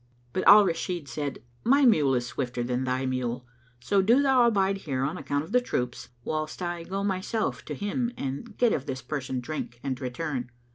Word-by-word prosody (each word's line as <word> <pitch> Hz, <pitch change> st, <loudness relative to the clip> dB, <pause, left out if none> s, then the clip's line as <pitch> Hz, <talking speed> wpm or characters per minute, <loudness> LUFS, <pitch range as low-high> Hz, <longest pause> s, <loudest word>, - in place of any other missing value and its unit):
But 185 Hz, -, 0 dB
Al 205 Hz, +1 st, +10 dB
Rashid 170 Hz, -2 st, -2 dB
said, 140 Hz, +1 st, -4 dB, 0.2 s
"My 275 Hz, +4 st, +5 dB
mule 150 Hz, -, +4 dB
is 120 Hz, -1 st, 0 dB
swifter 125 Hz, -1 st, -3 dB
than 125 Hz, +1 st, -1 dB
thy 130 Hz, +1 st, 0 dB
mule; 125 Hz, -1 st, -2 dB, 0.3 s
so 195 Hz, +11 st, +2 dB
do 230 Hz, +7 st, +5 dB
thou 260 Hz, -3 st, +5 dB
abide 195 Hz, -3 st, +2 dB
here, 135 Hz, -8 st, -2 dB
on 145 Hz, +5 st, -1 dB
account 145 Hz, -2 st, -2 dB
of 160 Hz, -, -11 dB
the 250 Hz, +1 st, +4 dB
troops, 125 Hz, -, -3 dB
whilst 155 Hz, 0 st, -3 dB
I 175 Hz, -1 st, -3 dB
go 195 Hz, +4 st, -3 dB
myself 200 Hz, +3 st, -1 dB
to -, -, -5 dB
him 235 Hz, +4 st, -1 dB
and 140 Hz, -, -5 dB
get 240 Hz, -2 st, +4 dB
of 140 Hz, -, -2 dB
this 130 Hz, -2 st, -4 dB
person 135 Hz, -3 st, -4 dB
[FN#219] 125 Hz, -, -2 dB
drink 120 Hz, -4 st, -5 dB
and 135 Hz, -1 st, -3 dB
return." 130 Hz, 0 st, -3 dB
155 Hz, 200 wpm, -27 LUFS, 130-200 Hz, 0.3 s, Al